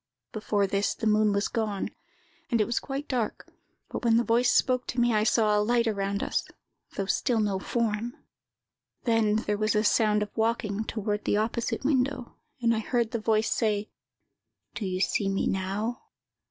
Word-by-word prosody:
"Before 210 -2 0
this, 200 +1 0
the - - -5
moon 215 0 +4
was 200 +1 +1
gone, 215 -4 -2 0.6
and 235 -3 +2
it 215 - +3
was 235 - 0
quite 275 +1 -5
dark; 240 -5 -2 0.4
but - - -5
when 230 -1 +4
the 235 - +3
voice 240 +1 +3
spoke 255 -1 +2
to 245 - -2
me, 240 -1 +3
I 215 0 +3
saw 215 -1 +3
a 210 - +3
light 235 +2 +2
around 200 -2 -1
us, - - -1 0.5
though 195 - -1
still 230 +4 +1
no 205 -3 0
form. 230 +2 -2 0.9
Then 225 -3 +2
there 210 -1 -1
was 215 0 +1
a 210 - +3
sound 210 -1 +3
of 210 - -9
walking 220 -2 0
toward 210 -1 -3
the - - +2
opposite 230 +4 -1
window, 260 -3 0 0.3
and 230 0 +4
I - - 0
heard 235 0 0
the 230 - -2
voice 220 0 +1
say, 215 -2 0 0.8
'Do 205 - -3
you 185 0 -2
see 195 0 +1
me 195 - 0
now? 195 +5 -2
220 Hz, 180 wpm, -27 LUFS, 210-235 Hz, 0.9 s, moon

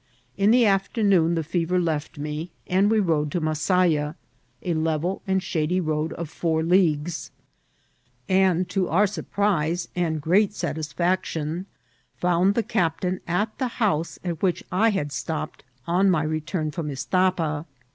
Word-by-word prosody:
In 200 +1 +3
the 240 +1 +5
afternoon 195 -4 +2
the 165 - -1
fever 175 +2 0
left 160 -3 -2
me, 150 +3 -4 0.2
and 190 +3 +3
we 220 0 +3
rode 155 -6 +1
to 175 - +1
Bfasaya, 155 -1 +1 0.5
a 175 - 0
level 160 +3 -1
and 190 -1 +1
shady 170 +1 0
road 155 -2 -1
of 170 - -5
four 160 +1 -1
leagues, 170 -2 +1 1.0
and, 185 -2 +3
to 185 -1 0
our 195 +6 +4
surprise 175 -3 -1
and 165 -3 0
great 190 +7 +3
satisfaction, 165 +2 -2 0.5
found 180 +3 +2
the 235 - +1
cap 165 -5 0
tain 185 0 -1
at 210 +5 0
the 260 - +1
house 170 -8 0
at 170 -3 -3
which 185 -3 +1
I 210 +5 +3
had 150 -9 -1
stopped 155 +1 -4 0.2
on 185 +3 +3
my 165 -4 +2
return 155 +1 -2
from 150 0 -4
Istapa. 160 +2 0
170 Hz, 145 wpm, -24 LUFS, 155-190 Hz, 1.0 s, the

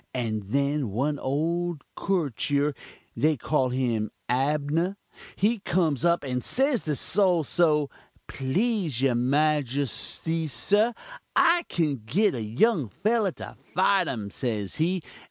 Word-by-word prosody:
And 110 -4 -1
then 140 +3 0
one 140 +8 -1
old 165 +3 -1
koretur, 145 - 0 0.4
they 150 +5 +2
call 130 +1 +1
him 120 -4 0 0.2
Abnah, 150 +7 0 0.4
he 220 +4 +1
comes 165 -9 0
up 170 -1 +3
and 125 -2 -2
says 265 -2 +1
to 150 -2 0
Sol 180 +2 +2
so: 150 -1 +2 0.3
'Please, 160 - -1
your 135 -2 +4
majustee, 145 +4 0
sir, 210 - +2 0.4
I 340 +1 +4
kin 150 -8 0
git 200 - +2
a 120 - -3
young 130 - +1
fellah 215 - +1
to - - -9 0.2
fite 190 -1 +3
um,' 105 -5 -4
says 110 -3 -3
he. 170 +2 0
150 Hz, 125 wpm, -26 LUFS, 130-180 Hz, 0.4 s, your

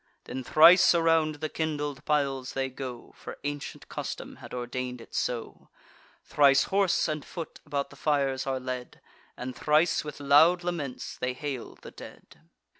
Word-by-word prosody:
Then 130 - -6
thrice 175 +7 +7
around 165 -2 +3
the 155 +1 -4
kindled 150 -3 -3
piles 135 -4 0
they 135 0 -1
go 130 -2 -8
(For - - -9
ancient 145 0 -5
custom - - -6
had - - -12
ordain'd 125 0 -4
it 115 - -14
so) 120 -2 -3 0.6
Thrice 140 -2 +5
horse 195 -2 +2
and 155 -2 -3
foot 165 -3 -8
about 140 -1 -2
the - - -13
fires 140 -2 0
are 135 -1 -1
led; 125 -1 -6 0.4
And 125 0 -6
thrice, 155 +5 +2
with 150 -1 -8
loud 155 +5 +5
laments, 160 -8 -4
they 125 0 -1
hail 135 -2 -6
the - - -12
dead. - - -13
145 Hz, 155 wpm, -28 LUFS, 130-155 Hz, 0.6 s, thrice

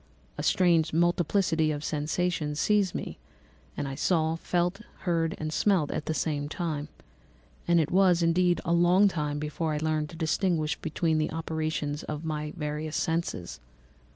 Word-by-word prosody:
A - - -4
strange 170 -4 +3
multiplicity 175 -1 +2
of 145 0 -4
sensations 150 0 -1
seized 205 -1 +2
me, - - -5 0.6
and 140 - -2
I 135 - -4
saw, 160 +2 +1
felt, 175 +4 -1 0.2
heard, 165 -2 0
and 155 0 -4
smelt 185 -7 +2
at - - -4
the 160 - -1
same 145 -2 -1
time; 155 -3 -3 0.8
and 170 0 +4
it 155 - 0
was, 180 -2 +4
indeed, 175 0 +2
a 170 - +1
long 175 +4 +5
time 150 -6 -2
before 150 +1 -2
I - - -1
learned 155 -1 -1
to 165 - -10
distinguish 160 -1 0
between 160 0 -1
the 155 - 0
operations 155 -2 -2
of 155 +1 -6
my 150 -1 -3
various 150 0 -3
senses. 165 - -2
160 Hz, 155 wpm, -28 LUFS, 150-175 Hz, 0.8 s, long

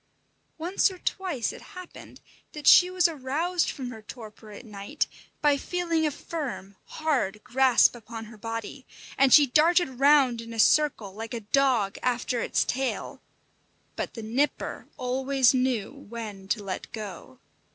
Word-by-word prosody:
Once 350 +5 +1
or 375 - -10
twice 355 - -2
it - - -11 0.2
happened 365 -1 -11 0.3
that 300 -2 -8
she 360 +5 +8
was 365 -1 +3
aroused 325 +4 -1
from 255 -4 -5
her 220 -2 -10
torpor 215 -1 -11
at 210 +4 -11
night 205 +7 -3 0.4
by 290 -1 +4
feeling 335 0 -1
a - - +1
firm, 275 - -6
hard 265 -11 -1
grasp 255 0 +4
upon 225 -1 -9
her 225 +1 -13
body, 225 +4 -6 0.3
and 275 0 +4
she 295 - +8
darted 305 0 +2
round 275 -4 +4
in 230 0 -9
a 225 - -6
circle 235 -7 +3
like 225 +3 -6
a - - -3
dog 225 -2 +1
after 245 -1 -1
its - - +1
tail; 265 0 -3 0.7
but - - -5
the 225 - -7
Nipper 255 +7 -2
always 260 +1 +2
knew 250 -5 0
when 220 -7 -9
to 210 +1 -1
let 190 -2 -6
go. 215 +3 -8
255 Hz, 150 wpm, -26 LUFS, 225-295 Hz, 0.7 s, she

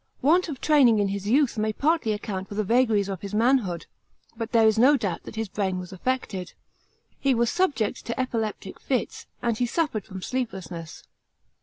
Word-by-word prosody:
Want 340 +5 +4
of 275 -5 -5
training 275 -7 +5
in 205 -1 +1
his 200 0 -4
youth 255 0 +2
may 215 0 +1
partly 295 0 +1
account 205 -2 -4
for 205 - -7
the 215 - 0
vagaries 220 -2 +2
of 195 -3 -5
his 200 +1 -5
manhood; 225 -7 +2 0.5
but 230 0 -5
there 230 -2 +5
is 220 0 +4
no 280 +5 +6
duubt 200 -7 -3
that - - -9
his 220 0 -2
brain 190 -1 -2
was 180 +1 -7
affected. 195 -3 -3 0.7
He 270 -2 +2
was 235 0 +2
subject 290 - 0
to 230 - -3
epileptic 225 -6 -3
fits, 255 -3 -2 0.2
and 235 -2 +1
he 245 - +1
suffered 265 - -1
from 190 -3 -8
sleeplessness. 185 -10 -5
220 Hz, 185 wpm, -25 LUFS, 200-255 Hz, 0.7 s, no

